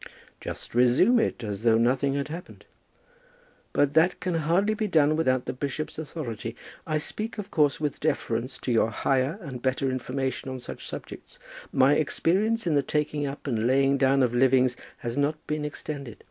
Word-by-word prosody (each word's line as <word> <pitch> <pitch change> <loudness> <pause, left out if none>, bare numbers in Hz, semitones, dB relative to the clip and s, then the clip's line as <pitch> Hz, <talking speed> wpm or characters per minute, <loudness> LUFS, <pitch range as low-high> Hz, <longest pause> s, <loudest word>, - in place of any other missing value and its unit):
"Just - - -7
resume 125 - +5
it, 120 - -1
as 105 -2 -4
though 115 -1 +4
nothing 130 +4 +2
had 140 +1 -2
happened." 170 +3 -9 1.1
"But 145 0 +2
that 165 +4 +4
may 180 -2 0
hardly 180 +7 +2
be 215 0 -1
done 155 -4 +3
without 130 -5 +1
the - - -3
bishop's 145 +4 -4
authority. 120 -8 -5 0.3
I 155 -1 +1
speak, 215 +9 -5
of 205 -2 -6
course, 145 -4 +2
with 150 -1 -2
deference 125 -4 -1
to 125 - -2
your 115 -1 +3
higher 130 - 0
and 130 -7 -7
better 130 +1 0
information 130 +1 -3
on 130 - -4
such 125 - -8
subjects. - - -9 0.3
My 135 +2 +5
experience 195 +9 +1
in 165 - +1
the 145 - +4
taking 150 0 -1
up 140 +1 -7
and 115 -4 0
laying 135 +1 +3
down 135 0 +4
of 120 -1 +1
livings 130 0 +4 0.2
has 120 +2 -5
not 145 +2 +2
been 150 0 -2
extended. 145 -5 -6
140 Hz, 175 wpm, -26 LUFS, 130-155 Hz, 1.1 s, resume